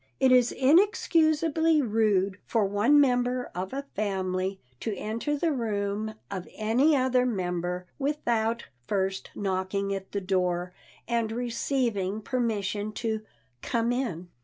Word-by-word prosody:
It 260 - +4
is 250 -1 +5
inexcusably 320 0 +3
rude 210 -6 +1
for 225 -3 +2
one 210 +9 +4
member 250 -2 +2
of 185 +2 -4
a 275 +1 -4
family 190 -2 -1 0.2
to 215 -3 -3
enter 230 +8 -2
the 330 +2 +1
room 215 -3 -2 0.2
of 185 -2 -5
any 245 +8 +3
other 255 -1 +3
member 180 -5 -2
without 235 -5 0 0.2
first 195 -1 -1
knocking 195 0 -1
at 195 -1 -6
the 200 - -1
door 180 -2 -1 0.3
and 230 -2 0
receiving 230 -4 -1
permission 215 -4 -1
to 220 -1 -2 0.4
"come 235 0 0
in." 220 -9 -2
220 Hz, 125 wpm, -27 LUFS, 195-255 Hz, 0.4 s, is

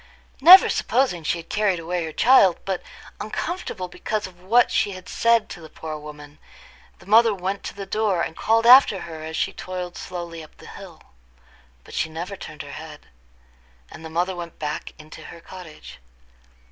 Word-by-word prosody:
Never 360 +6 +10
supposing 255 -10 0
she 165 - -1
had 165 - -11
carried 210 -3 +1
away 170 +1 -3
her 160 - -6
child, 200 - +5
but 190 -2 -2 0.4
uncomfortable 215 - -5
because 210 +4 -4
of 180 -1 -13
what 230 +7 +3
she 200 - 0
had 185 -1 -11
said 230 -1 +2
to 175 - -9
the 160 - -12
poor 155 0 -7
woman, 150 -1 -11 0.6
the - - -18
mother 220 +2 +5
went 190 +1 -4
to - - -6
the 200 -1 -7
door, 200 -3 0
and 160 - -5
called 225 +1 +1
after 240 -6 +7
her 160 -2 -8
as 160 0 -6
she - - -1
toiled 180 -1 -6
slowly 170 -2 -7
up 155 - -17
the - - -15
hill. - - -12 0.8
But - - -15
she 160 - -1
never 170 +5 -6
turned - - -9
her - - -11
head; - - -11 0.8
and - - -11
the 160 - -8
mother 175 +3 -1
went 170 -1 -8
back 150 0 -5
into 155 0 -13
her - - -11
cottage. 170 -2 -12
180 Hz, 185 wpm, -23 LUFS, 165-210 Hz, 0.8 s, Never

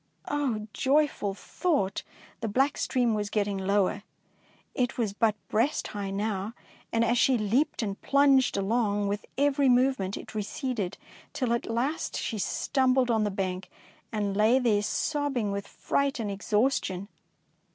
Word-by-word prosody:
Oh, 255 -8 -1
joyful 275 -8 +1
thought! 280 - -1 0.4
The 225 - -2
black 265 +7 +2
stream 245 -3 +1
was 210 -1 -1
getting 205 -2 0
lower, 200 +1 +1 0.7
it 250 -1 -1
was 220 -5 0
but 215 0 +2
breast 235 +8 0
high 200 -2 -4
now, 200 +1 -2 0.4
and 230 0 +2
as 235 +1 +2
she 260 -2 +4
leaped 235 +6 +1
and 200 -2 -4
plunged 275 -4 +4
along, 205 0 +1
with 205 +1 -3
every 280 -1 +3
move 260 +2 +4
ment 190 0 -3
it - - -9
receded, 215 -2 -3 0.4
till 250 -3 0
at 235 - -2
last 255 +8 -1
she 220 - -3
stum 260 +6 +1
bled 255 -2 +3
on 220 -2 +2
the - - +1
bank, 185 -1 -3 0.4
and 205 -2 -1
lay 215 +5 +4
there 230 -5 +2
sob 290 +6 -1
bing 215 -4 0
with 200 0 -4
fright 280 -2 -1
and 210 -3 -2
exhaustion. 205 -2 0
225 Hz, 155 wpm, -28 LUFS, 205-260 Hz, 0.7 s, she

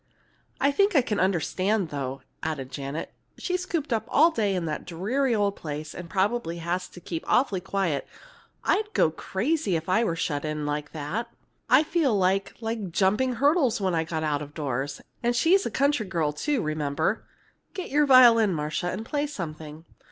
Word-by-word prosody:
"I 280 +1 +3
think 400 +5 +2
I 275 - +5
can 210 -4 -1
understand, 190 +1 +1
though," 135 -2 -4 0.2
added 140 -5 -4
Janet. 140 +3 -5 0.2
"She's 365 0 -2
cooped 305 -8 -1
up 220 -1 -1
all 325 +4 +5
day 210 -9 0
in 175 -2 -1
that 155 -2 -3
dreary 230 +10 0
old 200 -1 +1
place, 150 0 -6
and 175 -1 -8
probably 190 -2 0
has 175 +2 -2
to - - -13
keep 165 -1 -5
awfully 210 -8 +2
quiet. 190 -6 -1 0.6
I'd 425 +1 +1
go 160 - +3
crazy 220 - -1
if 160 0 -3
I 220 +5 +3
were 170 -7 0
shut 145 -3 -2
in 155 -1 -3
like 150 0 -3
that. 160 +10 -3 0.4
I'd 270 +5 +6
feel 300 -9 +2
like 190 +1 +1
like 225 -4 -3
jumping 210 +9 +2
hurdles 280 0 +2
when 190 -3 0
I 165 -1 +1
got 160 -1 -3
out 150 -2 0
of 145 0 -9
doors. 135 -2 -3 0.2
And 240 0 +1
she's 360 +10 +4
a - - -2
country 275 -2 +1
girl, 165 -5 0
too, 270 - -1
remember. 155 +4 -1 0.5
Get 370 -2 -5
your 295 +1 +3
violin, 230 -7 +7
Marcia, 155 +3 -2
and 205 +5 -4
play 290 +4 -1
something. 160 - -7
190 Hz, 180 wpm, -26 LUFS, 155-250 Hz, 0.6 s, violin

